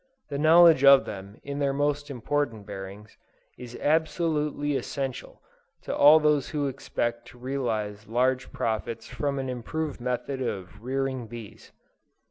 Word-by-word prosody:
The 140 Hz, -1 st, -3 dB
knowledge 160 Hz, -1 st, +7 dB
of 140 Hz, -1 st, +8 dB
them 100 Hz, +1 st, -8 dB
in 140 Hz, 0 st, -5 dB
their 140 Hz, -1 st, +1 dB
most 145 Hz, +1 st, -1 dB
important 130 Hz, -4 st, -2 dB
bearings, 100 Hz, +1 st, -9 dB, 0.4 s
is 120 Hz, -1 st, -9 dB
absolutely 150 Hz, -2 st, 0 dB
essential 135 Hz, -1 st, -5 dB, 0.4 s
to -, -, -3 dB
all 150 Hz, +2 st, +8 dB, 0.2 s
who 145 Hz, +1 st, -3 dB
expect 120 Hz, -3 st, -3 dB
to 125 Hz, -, -14 dB
realize 115 Hz, -5 st, -3 dB
large 130 Hz, +3 st, 0 dB
profits 115 Hz, 0 st, -3 dB
from 140 Hz, +3 st, -2 dB
an 135 Hz, -1 st, -3 dB
improved 130 Hz, +4 st, -4 dB
method 125 Hz, +2 st, -3 dB
of 95 Hz, -8 st, -5 dB
rearing 130 Hz, -1 st, -2 dB
bees. 115 Hz, -2 st, -11 dB
130 Hz, 130 wpm, -27 LUFS, 115-145 Hz, 0.4 s, of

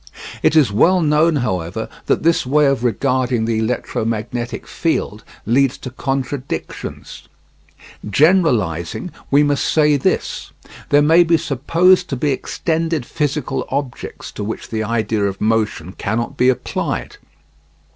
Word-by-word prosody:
It -, -, +3 dB
is 150 Hz, -9 st, +5 dB
well 175 Hz, -, +4 dB
known, 155 Hz, 0 st, +3 dB
however, 90 Hz, -, -2 dB, 0.2 s
that -, -, +1 dB
this 165 Hz, +1 st, +3 dB
way 150 Hz, +3 st, +3 dB
of 135 Hz, -4 st, +1 dB
regarding 125 Hz, 0 st, 0 dB
the 115 Hz, -1 st, 0 dB
electromagnetic 115 Hz, 0 st, -3 dB
field -, -, -2 dB, 0.2 s
leads 130 Hz, +3 st, +2 dB
to 130 Hz, -, -8 dB
contradictions. 135 Hz, +1 st, -5 dB, 0.8 s
Generalising 125 Hz, -, +2 dB, 0.2 s
we 145 Hz, +2 st, +5 dB
must 145 Hz, -4 st, +1 dB
say 150 Hz, +4 st, +3 dB
this: 130 Hz, -, -2 dB, 0.4 s
There 145 Hz, 0 st, +5 dB
may 165 Hz, +4 st, +6 dB
be 165 Hz, 0 st, +3 dB
supposed 170 Hz, +7 st, +2 dB
to 135 Hz, -, -2 dB
be 145 Hz, +3 st, 0 dB
extended 160 Hz, +1 st, -2 dB
physical 145 Hz, -2 st, -2 dB
objects 135 Hz, -2 st, -5 dB
to 105 Hz, -, -6 dB
which 110 Hz, +2 st, -5 dB
the 110 Hz, -1 st, -1 dB
idea 110 Hz, -1 st, -1 dB
of 95 Hz, -1 st, -3 dB
motion 110 Hz, -6 st, 0 dB
cannot 110 Hz, +4 st, -3 dB
be 125 Hz, -, +3 dB
applied. 130 Hz, -, -2 dB
130 Hz, 130 wpm, -19 LUFS, 115-150 Hz, 0.8 s, may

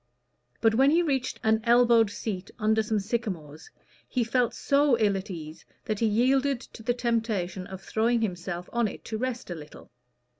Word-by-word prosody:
But 225 Hz, -1 st, +4 dB
when 265 Hz, +5 st, +5 dB
he 335 Hz, +4 st, +4 dB
reached 265 Hz, -5 st, -1 dB
an 220 Hz, 0 st, +3 dB
elbowed 235 Hz, -2 st, +5 dB
seat 200 Hz, -2 st, -5 dB
under 220 Hz, -1 st, +2 dB
some 215 Hz, 0 st, 0 dB
sycamores, 195 Hz, -9 st, -4 dB, 0.4 s
he 250 Hz, -, +1 dB
felt 240 Hz, +1 st, +1 dB
so 280 Hz, -3 st, +3 dB
ill 210 Hz, -3 st, +2 dB
at 195 Hz, +1 st, -5 dB
ease 160 Hz, -3 st, -8 dB, 0.2 s
that 215 Hz, -2 st, -2 dB
he 230 Hz, -, +2 dB
yielded 260 Hz, +4 st, +2 dB
to 235 Hz, -, -13 dB
the 240 Hz, +2 st, 0 dB
temptation 220 Hz, -7 st, -1 dB
of 190 Hz, -1 st, -9 dB
throwing 230 Hz, +2 st, +1 dB
himself 180 Hz, -3 st, -3 dB
on 235 Hz, -1 st, +2 dB
it -, -, -9 dB
to 220 Hz, -1 st, -4 dB
rest 250 Hz, -5 st, -3 dB
a -, -, -1 dB
little. 150 Hz, -3 st, -12 dB
225 Hz, 180 wpm, -27 LUFS, 195-240 Hz, 0.4 s, when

